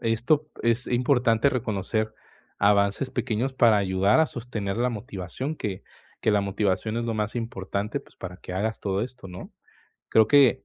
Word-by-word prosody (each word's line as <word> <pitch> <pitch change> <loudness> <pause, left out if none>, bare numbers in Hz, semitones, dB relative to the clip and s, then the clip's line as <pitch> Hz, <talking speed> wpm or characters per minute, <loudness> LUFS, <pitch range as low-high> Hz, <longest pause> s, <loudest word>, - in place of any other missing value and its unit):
esto 125 +7 +1
es 115 +2 +1
importante 125 0 +3
reconocer 110 -2 -1 0.4
avances 100 +5 +3
pequeños 125 +2 -1
para 120 -4 +5
ayudar 95 +5 +3
a 160 - +4
sostener 110 -7 -4
la 120 +2 +2
motivación, 110 - -5
que 100 -7 -4 0.4
que - - +2
la 105 -1 +3
motivación 100 +2 -1
es 120 - -1
lo 115 -1 -1
más 105 +1 -2
importante, 105 -2 -3
pues, - - -19
para 90 -1 -8
que 90 - -9
hagas 110 +4 -1
todo 100 0 -1
esto, 125 -3 -7
¿no? 90 0 -9 0.6
Creo 110 -1 +5
que 135 0 +5
110 Hz, 165 wpm, -26 LUFS, 100-125 Hz, 0.6 s, para